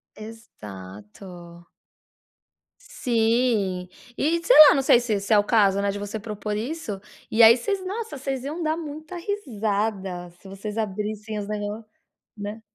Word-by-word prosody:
Exato. 170 - -11 1.1
Sim, 225 - 0 0.3
e 335 +3 +1
sei - - +5
lá, - - +4
não 275 - +2
sei 250 - +5
se 225 -4 -1
se 200 +3 0
é 210 - +6
o - - +2
caso, 200 -3 +3
né, 200 - 0
de 205 - -6
você 205 +2 -5
propor, 210 0 -5
isso, 230 -4 -4 0.3
e 225 - +3
aí, 225 +1 +9
vocês 380 - -3
nossa 425 -3 -5
vocês 270 -1 -4
iam 305 +5 -5
dar 310 0 0
muita 310 +2 -8
risada 210 - -3
se - - -15
vocês 200 +3 -7
abrissem 215 +1 -3
os, 200 - -5
negó 210 +1 -4 0.5
né? 205 +2 -6
215 Hz, 150 wpm, -24 LUFS, 200-260 Hz, 1.1 s, aí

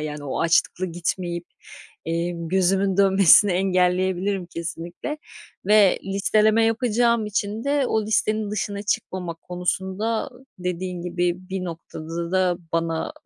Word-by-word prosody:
yani, 150 -1 -5
o 135 - -3
açlıkla 170 +2 +2
gitmeyip, 175 0 -3 0.6
emm, 170 0 -2
gözümün 190 +1 +2
dönmesini 195 0 +6
engelleyebilirim 185 +1 +1
kesinlikle 170 - -6 0.5
ve 205 -2 +5
listeleme 215 +3 +3
yapacağım 235 0 +2
için 210 +1 -2
de 280 -2 +1
o 220 - +1
listenin 215 -1 0
dışına 205 -1 -3
çıkmamak 180 -4 -3
konusunda 190 +6 -2 0.3
dediğin 180 0 -4
gibi 175 0 0 0.2
bir 190 -1 -3
noktada 165 0 -6
da 185 -2 +2
bana 165 - -1
185 Hz, 115 wpm, -23 LUFS, 175-210 Hz, 0.6 s, dönmesini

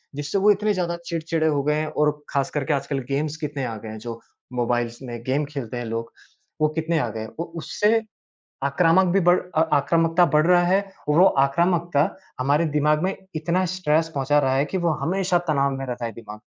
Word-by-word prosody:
जिससे 145 +7 -2
वो 205 +2 +5
इतने 210 +1 +1
ज़्यादा 170 -2 -1
चिड़चिड़े 165 -1 -1
हो 145 -2 +1
गए 150 +1 +1
हैं, 155 0 -1
और 150 0 +1 0.2
ख़ास 140 -2 0
करके 150 +1 -1
आजकल 140 0 -2
गेम्स 150 +2 -1
कितने 145 -4 -4
आ 115 -2 -4
गए 110 +1 -9
हैं, 110 - -7
जो 115 0 -7 0.3
मोबाइल्स 120 0 -1
में 120 -2 -7
गेम 140 +3 0
खेलते 135 -5 -6
हैं 120 - -4
लोग, 115 +1 -4 0.5
वो 155 - +5
कितने 160 +1 0
आ - - 0
गए 110 - -6
हैं। 110 - -6
वो 170 - -1
उससे 210 +7 +1 0.6
आक्रामक 165 +6 +3
भी 195 - +4
बढ़ 175 +1 +4 0.2
अ, 160 - +4
आक्रामकता 165 +4 +3
बढ़ 155 +2 +4
रहा 175 -1 +5
है, 190 +2 +3 0.3
वो 165 +5 +5 0.2
आक्रामकता 170 +1 +1 0.4
हमारे 145 +5 +2
दिमाग 150 +2 +2
में 190 +1 -1 0.2
इतना 170 +4 0
स्ट्रेस 160 -2 +1
पहुँचा 140 +2 +2
रहा 130 -1 +1
है 140 - +2
कि 190 - -3
वो 165 - +3
हमेशा 185 0 +1
तनाव 140 -2 +2
में 135 - -4
रहता 120 -1 -4
है 115 - -3
दिमाग। 105 -1 -10
150 Hz, 205 wpm, -23 LUFS, 135-170 Hz, 0.6 s, वो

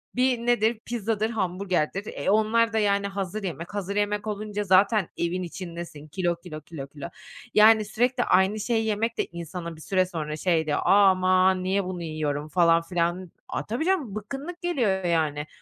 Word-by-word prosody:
bir 250 0 +2
nedir? 235 -2 +2
Pizzadır, 225 -2 -1
hamburgerdir. 190 -2 -2
E, 140 - -2
onlar 220 +2 +3
da, 220 - +2
yani, 200 -1 +1
hazır 200 +1 -4
yemek. 170 0 -5
Hazır 200 -1 -3
yemek 205 +1 -1
olunca 210 0 -3
zaten 195 0 +3
evin 175 +2 -1
içindesin. 170 -4 -8
Kilo, 175 +2 -1
kilo, 170 -3 -9
kilo, 150 -5 -8
kilo. 145 +3 -8 0.4
Yani, 215 0 +6
sürekli 245 +4 +1
aynı 190 +3 +3
şeyi 225 +1 0
yemek 220 +2 -1
de - - 0
insana 170 0 -7
bir 155 - -14
süre 185 +2 +1
sonra 155 -4 -4
şey 165 -1 +1
diyor, 150 -1 0
"Aman, 185 -1 +4
niye 195 +2 +1
bunu 180 -2 -5
yiyorum?" 150 -2 -3
falan 170 -1 +4
filan 175 +1 -2 0.2
A, - - -4
tabii, 240 +9 -2
canım 320 - 0
bıkkınlık 275 - -6
geliyor, 235 - 0
yani. 155 -3 0
190 Hz, 170 wpm, -26 LUFS, 170-215 Hz, 0.4 s, Yani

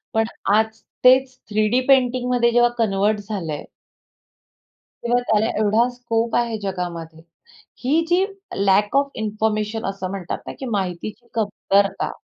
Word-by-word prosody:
पण 225 0 +3 0.3
आज 220 0 +4 0.4
तेच 260 +1 +5
थ्रीडी 215 +4 +2
पेंटिंगमध्ये 250 -2 +3
जेव्हा 240 0 +4
कन्व्हर्ट 210 -1 +1
झालंय 165 -8 -4 1.4
किंवा 240 +1 +2
त्याला 215 0 +3
एवढा 215 +3 +3
स्कोप 235 -2 -2
आहे 235 -2 +1
जगामध्ये. 170 -4 -5 0.6
ही 295 +6 +3
जी 360 +2 +3 0.4
लॅक 205 +4 +3
ऑफ 280 0 +2
इंन्फॉरमेशन 215 0 -1
असं 195 -1 -4
म्हणतात 185 -3 -4
ना, - - -5
की 265 - -5
माहितीची 210 +1 -4
कमतरता. 200 -2 0
220 Hz, 125 wpm, -21 LUFS, 200-245 Hz, 1.4 s, तेच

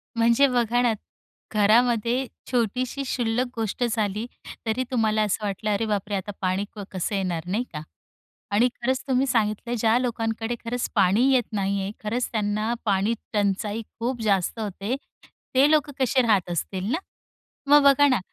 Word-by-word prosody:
म्हणजे 235 +4 +4
बघा 245 -1 +1
ना, 240 -2 +3 0.6
घरामध्ये 235 +4 +3 0.3
छोटीशी 250 +3 0
शुल्लक 245 0 0
गोष्ट 225 +2 -2
झाली, 215 -1 -1 0.4
तरी 225 +4 0
तुम्हाला 220 -3 +2
असं 210 +1 -1
वाटलं, 205 +1 -2
अरे 205 +2 0
बापरे! 205 -1 -1
आता 195 +2 -3
पाणी 190 +2 0
क 205 - -6
कसं 190 +2 -2
येणार 180 -3 -2
नाही 205 +7 0
का. 150 - -4 0.7
आणि 225 +5 +4
खरंच 260 +1 0
तुम्ही 260 0 +2
सांगितलं, 225 0 0
ज्या 225 +1 +3
लोकांकडे 225 -1 -2
खरंच 240 +1 -2
पाणी 200 +3 +4
येत 250 -2 +4
नाही 200 -1 0
आहे 195 - -3
खरंच 235 +4 -1
त्यांना 215 +1 0
पाणी 200 +2 +2 0.2
टंचाई 205 +2 0 0.2
खूप 240 0 -2
जास्त 200 +1 +1
होते, 205 +3 -3 0.6
ते 275 +3 +6
लोक 300 -2 +3
कसे 260 0 +3
राहत 195 -5 +2
असतील 185 +4 -2
ना? 315 - +2 0.7
मग 290 0 +7
बघा 280 +1 +6
ना, 255 -3 +3
225 Hz, 155 wpm, -25 LUFS, 205-245 Hz, 0.7 s, मग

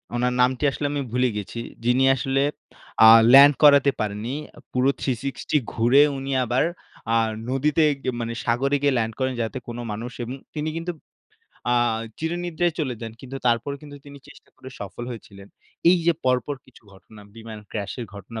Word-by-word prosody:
উনার 125 +1 0
নামটি 125 +2 +1
আসলে 145 - -4
আমি 145 -1 -2
ভুলে 125 0 +2
গেছি। 105 +3 -6 0.3
যিনি 125 +2 +3
আসলে 135 +2 0 0.6
আ - - +10 0.3
ল্যান্ড 140 +2 +9
করাতে 140 -1 +7
পারেননি। 110 +5 -3 0.4
পুরো 130 +2 +2
360 135 +3 -2 0.2
ঘুরে 120 +5 +4 0.2
উনি 135 +1 -5
আবার 125 +4 +1 0.5
আ - - +4 0.3
নদীতে 150 +4 +1 0.2
গি - - -8
আ - - -11
মানে 115 0 -3
সাগরে 135 +4 +1
গিয়ে 140 -2 +2
ল্যান্ড 110 -1 -1
করেন 130 0 0
যাতে 115 +3 -3
কোনো 120 0 -6
মানুষ 115 +4 -5
এবং 125 +3 -5 0.2
তিনি 150 +1 -2
কিন্তু 170 +2 -3 0.8
আ - - +3 0.4
চিরনিদ্রায় 175 +1 -1
চলে 130 -6 -1
যান। 115 -1 -6
কিন্তু 135 +1 -8
তারপর 120 +4 +1
কিন্তু 145 -1 -11
তিনি 140 0 -11
চেষ্টা 140 - -17
করে 130 - -11
সফল 105 +4 -7
হয়েছিলেন। 100 -4 -11 0.4
এই 185 - +5
যে 170 - +5
পরপর 130 +3 +1
কিছু 130 - -20
ঘটনা 105 +2 -16
বিমান 110 -1 -9
ক্রাশ 100 -2 -4
এর - - -4
ঘটনা 105 +3 -8
130 Hz, 175 wpm, -23 LUFS, 115-140 Hz, 0.8 s, আ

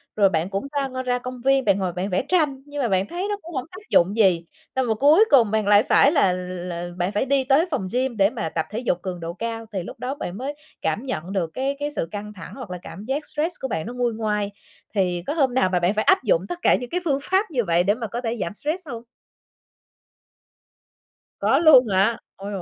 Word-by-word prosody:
rồi 200 -2 +5
bạn 165 +1 -1
cũng 200 +8 -3 0.3
ra 255 0 -3
ra 250 -1 0
công 250 0 -7
viên, 270 0 +3
bạn 195 - +4
ngồi 185 -2 -1
bạn 185 +3 -3
vẽ 185 +6 0
tranh 300 -7 +1
nhưng 290 -1 -5
mà 240 - +1
bạn 190 +1 +1
thấy 365 +3 -3
nó 410 - -1
cũng 335 -2 -10
hổng 255 - -2
tác 415 +4 -13
dụng 190 +5 +3
gì, 180 -6 +3 0.3
xong 260 -1 +1
rồi 220 -2 +1
cuối 305 - +6
cùng 235 -7 +6
bạn 215 -2 0
lại 205 +1 +6
phải 280 - +5
là 195 - +3
là 180 -1 -5
bạn 180 +3 0
phải 210 +6 0
đi 275 0 +2
tới 280 +6 +3
phòng 190 -9 -1
gym 255 -2 0
để 195 +1 +4
mà 165 - -4
tập 160 0 -2
thể 215 +3 -4
dục 180 -8 -1
cường 185 -2 -5
độ 165 +1 -5
cao, 230 +1 -4
thì 185 -3 -2
lúc - - -10
đó 265 +3 -3
bạn 185 -7 -5
mới 275 +4 -4 0.3
cảm 235 +7 -1
nhận 185 -7 -4
được 175 -4 -1
cái 275 +2 -1
cái 290 0 -2
sự 165 - -2
căng 210 +1 -6
thẳng 185 - -10
hoặc 255 -8 -8
là 180 - -5
cảm 195 +4 -9
giác 280 +4 -2
stress 325 +4 -2
của 265 - -1
bạn 160 -7 -3
nó 240 - -6
nguôi 245 -2 0
ngoai. 210 -2 -1 0.4
Thì 180 -3 0
có 290 - 0
hôm 270 -6 +2
nào 255 -8 +3
mà 180 -1 +1
bạn 175 +4 +2
phải 215 - 0
áp 380 0 +4
dụng - - +3
tất 350 0 -4
cả - - +5
những 245 -1 -5
cái 360 - -1
phương 280 -3 +1
pháp 380 +3 +2
như 245 -5 +1
vậy 170 -1 +2
để 200 +2 +3
mà 225 -1 -5
có 235 +4 -4
thể 230 0 -2
giảm 170 - -3
stress 310 - -4
hông? 235 -3 -6 2.4
Có - - +3
luôn 295 -7 +7
hả? 200 +4 +2 0.2
Ôi 200 +1 -7
dồi 195 -3 -4
230 Hz, 255 wpm, -23 LUFS, 190-275 Hz, 2.4 s, luôn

